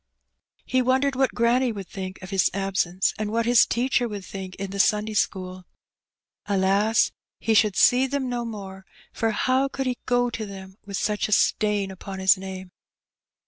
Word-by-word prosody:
He 255 - +1
wondered 260 +2 +1
what 265 0 +1
granny 240 +2 +2
would 200 -4 -7
think 185 -1 -7
of 185 - -9
his 190 -2 +3
absence, 195 -2 0
and 215 -1 -2
what 230 +1 0
his 240 -1 +5
teacher 245 0 +1
would 205 -4 -7
think 190 -1 -7
in 195 -1 -6
the 200 - -5
Sunday 210 +2 +2
school. 185 -3 -2 0.9
AJas! 200 +3 +2 0.3
he 225 - +1
should 210 -2 +3
see 255 +2 +4
them 275 -1 -2
no 245 -1 -2
more, 195 -4 -8 0.3
for 225 - 0
how 255 +5 +1
could 270 0 -4
he 250 -1 -2
go 245 0 +2
to 220 -2 -5
them 190 -1 -10
with 200 -1 -4
such 210 -1 -1
a - - -8
stain 210 -1 +2
upon 190 +1 -8
his 190 0 +5
name? 190 -1 -8
210 Hz, 180 wpm, -24 LUFS, 190-245 Hz, 0.9 s, his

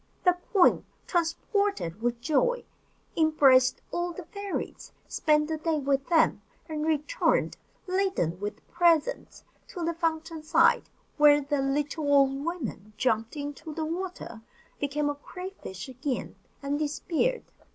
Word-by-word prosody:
The 360 -1 +5 0.2
queen, 385 -4 +5 0.2
transported 345 - -1
with 235 0 -1
joy, 485 - +1 0.5
embraced 275 -5 +4
all 345 0 -2
the 355 0 -8
fairies, 400 +2 -5 0.2
spent 300 -1 +2
the 320 0 -2
day 320 0 0
with 275 -1 0
them, 325 -2 +3 0.3
and 310 -2 -3
returned, 315 - +1 0.3
laden 370 - 0
with 205 +1 -6
presents, 340 -3 +1 0.2
to 350 -3 -5
the 335 - 0
fountain 325 -1 -2
side; 310 - +3 0.3
where 295 -1 +7
the 285 0 -1
little 290 +2 -1
old 275 0 +4
woman 245 - -5
jumped 225 +2 0
into 290 +2 -6
the 320 - -2
water, 340 -8 -5 0.4
became 290 +1 -1
a 290 - 0
cray 365 +6 -8
fish 190 - -8
again, 260 +1 -4 0.3
and 285 +1 -1
disappeared. 330 +10 -1
305 Hz, 130 wpm, -28 LUFS, 275-345 Hz, 0.5 s, where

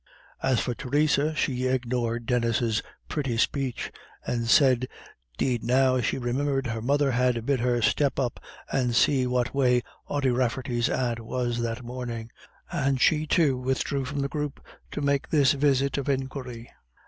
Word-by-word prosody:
As 130 -3 +2
for 125 - -1
Theresa, 150 +4 +1
she 130 -4 0
ignored 120 -2 -1
Denis's 115 -2 +1 0.3
pretty 135 -6 -2
speech, 130 +1 -1 0.3
and 115 -1 -1
said 130 -1 +5 0.5
'deed 125 -3 0
now 130 +1 +3
she - - 0
remembered 135 +2 -1
her 115 -2 -3
mother 140 +3 +2
had 125 -2 +1
bid 140 -1 +1
her 120 -1 +1
step 140 +4 +2
up 125 -3 -1 0.3
and 125 -3 +1
see 130 0 +3
what 125 -1 0
way 125 -3 +3 0.2
Ody 140 -3 +1
Rafferty's 125 0 0
aunt 120 -2 -1
was 120 +1 -2
that 115 +1 -3
morning. 120 -2 -6 0.4
And 135 -1 0
she, 155 +3 +3
too, 150 -5 +3
withdrew 130 +1 -1
from 140 +2 -3
the 140 - 0
group 150 -1 -4 0.3
to - - -5
make 140 -1 0
this 145 -4 +4
visit 140 -1 +2
of 140 - -3
inquiry. 130 -3 -4
130 Hz, 155 wpm, -26 LUFS, 120-140 Hz, 0.5 s, said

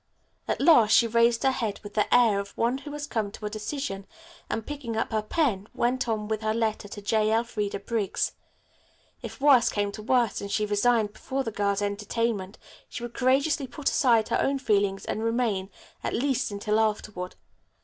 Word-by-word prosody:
At - - -1
last 270 -9 +6
she 235 - +6
raised 235 +1 +3
her 270 - +4
head 220 -5 -3
with 205 - -9
the 210 - 0
air 230 -5 +5
of 200 0 -7
one 240 +3 +1
who 290 +1 -9
has 295 0 -4
come 220 -8 -2
to 215 - -8
a 210 - -3
decision, 215 -2 -4 0.4
and, 225 - -3
picking 270 -7 -5
up 225 - -1
her 215 -1 +1
pen, 215 - 0
went 245 0 0
on 215 -2 -1
with 220 0 -2
her 215 0 0
letter 220 -2 -1
to 205 0 -9
J. 215 +1 +2
Elfreda 220 -3 -1
Briggs. 210 -1 -1 0.9
If - - -8
worse 270 -4 +5
came 205 -1 -1
to 215 - -8
worst 240 -1 +1
and 200 - -5
she 210 +1 +1
resigned 210 +1 +2
before 270 +4 -3
the 225 - -4
girls' 200 -1 0
entertainment 205 0 -2 0.3
she 240 - -7
would 240 0 -6
courageously 270 +4 +1
put 270 +3 -2
aside 235 -7 +3
her - - +1
own 275 0 +1
feelings 200 -6 0
and 220 - -3
remain, 225 -5 0 0.3
at - - -2
least, 265 +1 0
until 210 +1 -1
afterward. 210 -4 -2
225 Hz, 190 wpm, -27 LUFS, 205-245 Hz, 0.9 s, last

